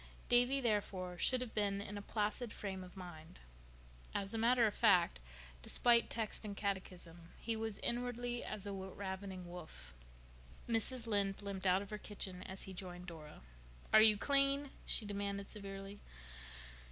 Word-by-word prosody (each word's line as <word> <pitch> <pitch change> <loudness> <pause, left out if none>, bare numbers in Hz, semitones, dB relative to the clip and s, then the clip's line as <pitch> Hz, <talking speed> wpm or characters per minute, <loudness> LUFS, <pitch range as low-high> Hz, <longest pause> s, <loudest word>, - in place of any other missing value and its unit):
Davy, 245 +3 +5
therefore, 200 -6 0
should 255 -1 +3
have 245 -3 -4
been 200 -1 +1
in 200 +1 -5
a 205 - -4
placid 210 +3 -1
frame 190 -3 -4
of 180 +1 -12
mind. 175 -2 -9 0.8
As 195 +1 -1
a - - 0
matter 235 +1 +5
of 210 - +2
fact, 180 - +5 0.4
despite 235 - +4
text 225 -1 -2
and 205 -2 -5
catechism, 180 -4 -3
he 230 0 -1
was 220 -2 -2
inwardly 245 0 -1
as 205 -2 -4
a 200 - -3
ravening 190 -1 -5
wolf. 160 - -8 0.7
Mrs. 235 +1 +1
Lynde 200 -2 +1
limped 195 -1 -2
out 185 +2 +4
of 200 - -11
her 210 - -3
kitchen 190 -4 -5
as 190 +1 -6
he 190 - -7
joined 180 -1 -6
Dora. 160 - -9 0.5
"Are 215 - +10
you 215 -1 +7
clean?" 275 +2 +3 0.2
she 220 - +1
demanded 200 -1 -2
severely. 195 0 -6
200 Hz, 155 wpm, -38 LUFS, 190-225 Hz, 0.8 s, Are